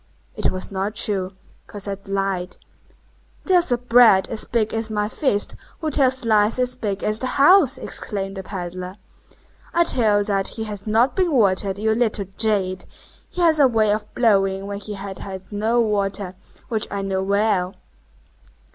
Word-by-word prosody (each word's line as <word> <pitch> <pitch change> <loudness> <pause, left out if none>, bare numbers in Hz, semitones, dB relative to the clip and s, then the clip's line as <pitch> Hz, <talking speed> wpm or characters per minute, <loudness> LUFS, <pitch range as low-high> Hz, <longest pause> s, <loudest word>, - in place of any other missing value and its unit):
It - - 0
was 185 +1 -5
not 195 +2 -3
true; 200 -4 0 0.4
Cosette 200 -1 -7
lied. 195 -2 -2 0.9
"There's 355 -6 +3
a 245 - +3
brat 240 -5 +5
as 225 - -2
big 220 -3 -1
as 225 0 -2
my 210 -1 -1
fist 210 -3 0 0.2
who 315 -2 -2
tells 260 -3 +2
lies 215 0 +3
as 250 0 0
big 200 -2 -4
as 215 +1 +1
the 260 - -2
house," 290 0 +5
exclaimed 195 -5 -4
the - - -4
pedler. 185 -1 -6 0.8
"I 340 - +5
tell 225 -10 +3
you 205 - +1
that 200 -2 -1
he 220 - -4
has 210 -1 -6
not 230 +5 +2
been 365 -3 +1
watered, 195 -6 +2
you 220 +1 +1
little 220 -3 0
jade! 200 -4 0 0.5
He 360 - -5
has 320 -2 +4
a 280 - +7
way 220 -4 +2
of 210 0 -3
blowing 195 -4 +2
when 200 0 -5
he 210 +1 -7
has 195 -1 -7
had 190 -1 -7
no 220 +3 0
water, 200 -4 0 0.3
which 220 -2 -2
I 200 -1 -4
know 190 -1 -1
well." 200 -1 0
210 Hz, 170 wpm, -21 LUFS, 195-235 Hz, 0.9 s, a